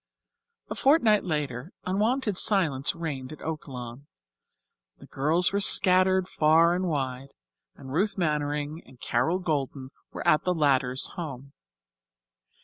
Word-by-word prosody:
A - - 0
fortnight 240 -8 +3
later 150 -2 -4
unwonted 210 +4 0
silence 165 -10 +2
reigned 145 -6 -5
at 155 - -11
Oaklawn. 135 -4 -7 0.9
The - - -14
girls 165 +7 +1
were 200 - +1
scattered 185 -1 +3
far 165 +2 +3
and 185 +1 -1
wide, 135 -3 -4 0.4
and 130 0 -10
Ruth 200 +6 0
Mannering 150 -1 -2
and 130 - -18
Carol 170 +7 0
Golden 140 -6 -3 0.2
were - - -6
at 150 - +4
the 180 0 0
latter's 130 -4 +1
home. 140 -6 -8
155 Hz, 125 wpm, -26 LUFS, 135-185 Hz, 0.9 s, at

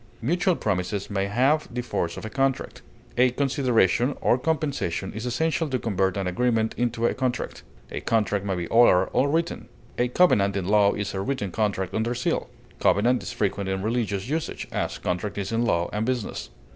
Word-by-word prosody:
Mutual 175 - +1
promises 100 - -2
may 100 -1 0
have 130 +9 +2
the 125 +1 -3
force 85 -7 -2
of - - -6
a - - -4
contract. 135 +1 -1 0.4
A 125 +1 +5
consideration, 125 -2 +2
or 125 - +2
compensation, 140 - -1
is 110 +4 -4
essential 160 +5 0
to 130 - 0
convert 100 -4 0
an 100 - -1
agreement 110 +3 +1
into 120 -1 0
a - - +2
contract. 130 -2 -2 0.3
A - - -4
contract 105 -3 +1
may 100 -2 -1
be 85 -1 -3
oral 105 -6 +5
or 140 - +3
written. 165 +3 -1 0.3
A 125 - +3
covenant 105 - +3
in 95 -2 -2
law 100 0 +4
is 105 -1 -3
a 95 - -2
written 125 -4 -2
contract 100 -2 -1
under 115 +2 0
seal. 125 - -1 0.3
Covenant 120 +5 +3
is - - -5
frequent 100 -4 -1
in 95 0 -2
religious 110 -3 -1
usage, 160 +3 -3
as - - -2
contract 90 +4 -3
is 100 +1 -3
in 115 +1 +1
law 85 -6 +1
and 105 +1 0
business. 125 -2 -3
115 Hz, 185 wpm, -25 LUFS, 100-130 Hz, 0.4 s, A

